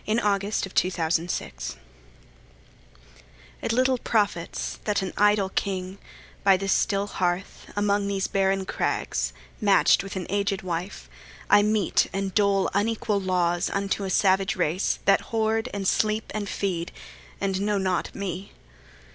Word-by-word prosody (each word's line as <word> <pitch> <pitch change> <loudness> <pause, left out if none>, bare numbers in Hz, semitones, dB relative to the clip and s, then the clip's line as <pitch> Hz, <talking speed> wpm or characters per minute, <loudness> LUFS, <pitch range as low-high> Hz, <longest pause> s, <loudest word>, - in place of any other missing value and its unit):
Alfred, 215 +2 +2 0.3
Lord 200 -2 -3
Tennyson 170 -1 +1
Ulysses 60 - -4 1.9
IT - - -1
LITTLE 255 +2 +2
profits 205 -8 -1
that 205 -2 +1
an 190 - -4
idle 205 -1 +3
king, 190 0 -3 0.4
By 195 -1 +6
this 195 +1 +1
still 200 0 +1
hearth, 185 -1 -2
among 205 0 +1
these 195 -1 -1
barren 195 0 +1
crags, - - -1 0.3
Match'd 200 -2 +5
with 195 0 -7
an 185 -2 -3
aged 200 0 -1
wife, 180 +2 -4 0.4
I 205 - +8
mete 210 -2 +2
and 195 0 -2
dole 200 -2 +3
Unequal 210 0 0
laws 175 -1 +1
unto 200 0 -1
a 190 - -3
savage 190 +1 +2
race, 180 0 0
That 195 0 +5
hoard, 225 0 0
and 200 -1 -3
sleep, 215 +2 +1
and 205 -2 -3
feed, 175 -4 -2 0.5
and 195 -1 -1
know 205 0 +1
not 185 -2 -1
me. 190 0 -5
195 Hz, 140 wpm, -25 LUFS, 185-205 Hz, 1.9 s, I